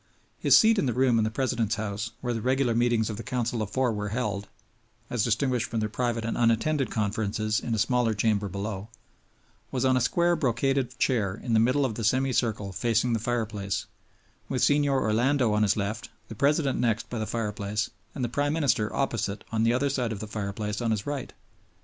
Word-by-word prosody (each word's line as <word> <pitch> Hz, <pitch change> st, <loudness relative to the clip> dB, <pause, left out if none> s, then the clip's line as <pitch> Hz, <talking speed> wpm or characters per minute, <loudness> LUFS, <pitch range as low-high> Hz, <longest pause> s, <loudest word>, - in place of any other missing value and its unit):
His -, -, +6 dB
seat 225 Hz, -1 st, +5 dB
in 140 Hz, -, +1 dB
the 120 Hz, -, -1 dB
room 125 Hz, -2 st, +3 dB
in -, -, +2 dB
the -, -, 0 dB
President's 115 Hz, -2 st, 0 dB
house, 105 Hz, +1 st, -3 dB
where 125 Hz, -1 st, -1 dB
the 115 Hz, -, -3 dB
regular 130 Hz, 0 st, +1 dB
meetings 120 Hz, -2 st, +2 dB
of 105 Hz, -, -6 dB
the -, -, -5 dB
Council 120 Hz, -2 st, -2 dB
of 105 Hz, -, -3 dB
Four 130 Hz, -1 st, +1 dB
were 105 Hz, 0 st, -3 dB
held 105 Hz, -3 st, -2 dB, 0.6 s
(as 120 Hz, -4 st, +1 dB
distinguished 120 Hz, +1 st, 0 dB
from 115 Hz, -, -1 dB
their 110 Hz, 0 st, -1 dB
private 115 Hz, 0 st, -1 dB
and 115 Hz, -, -2 dB
unattended 120 Hz, +3 st, +2 dB
conferences 110 Hz, 0 st, -1 dB
in 115 Hz, -, -2 dB
a -, -, -2 dB
smaller 115 Hz, 0 st, +2 dB
chamber 105 Hz, -1 st, +1 dB
below), 100 Hz, +2 st, -5 dB, 0.8 s
was 130 Hz, 0 st, -1 dB
on 130 Hz, 0 st, +4 dB
a 130 Hz, -, +2 dB
square 175 Hz, +8 st, +2 dB
brocaded 135 Hz, -2 st, 0 dB
chair 105 Hz, -8 st, +1 dB
in 115 Hz, +1 st, -4 dB
the 110 Hz, -, +5 dB
middle 125 Hz, +5 st, +3 dB
of 120 Hz, -, -1 dB
the 115 Hz, -, -5 dB
semicircle 115 Hz, -4 st, +1 dB
facing 115 Hz, +5 st, +1 dB
the 115 Hz, -, +1 dB
fireplace, 110 Hz, -4 st, -2 dB, 0.6 s
with 130 Hz, -, 0 dB
Signor 145 Hz, -2 st, +3 dB
Orlando 120 Hz, +2 st, +2 dB
on 105 Hz, -, +2 dB
his 105 Hz, -1 st, +3 dB
left, 105 Hz, +2 st, -3 dB, 0.2 s
the 110 Hz, -, -7 dB
President 140 Hz, +2 st, +2 dB
next 115 Hz, -2 st, 0 dB
by 120 Hz, -, -3 dB
the 110 Hz, -, -2 dB
fireplace, 105 Hz, -1 st, -2 dB, 0.2 s
and 130 Hz, -, -3 dB
the -, -, -1 dB
Prime 145 Hz, +5 st, 0 dB
Minister 125 Hz, -9 st, +1 dB
opposite 110 Hz, -7 st, -2 dB
on 110 Hz, -1 st, 0 dB
the 115 Hz, +1 st, +3 dB
other 140 Hz, +3 st, +1 dB
side 125 Hz, -4 st, -1 dB
of 105 Hz, -, -4 dB
the 110 Hz, -, -5 dB
fireplace 105 Hz, +1 st, -4 dB
on 115 Hz, -, 0 dB
his 105 Hz, -2 st, -1 dB
right. 145 Hz, -3 st, -4 dB
115 Hz, 205 wpm, -27 LUFS, 110-130 Hz, 0.8 s, His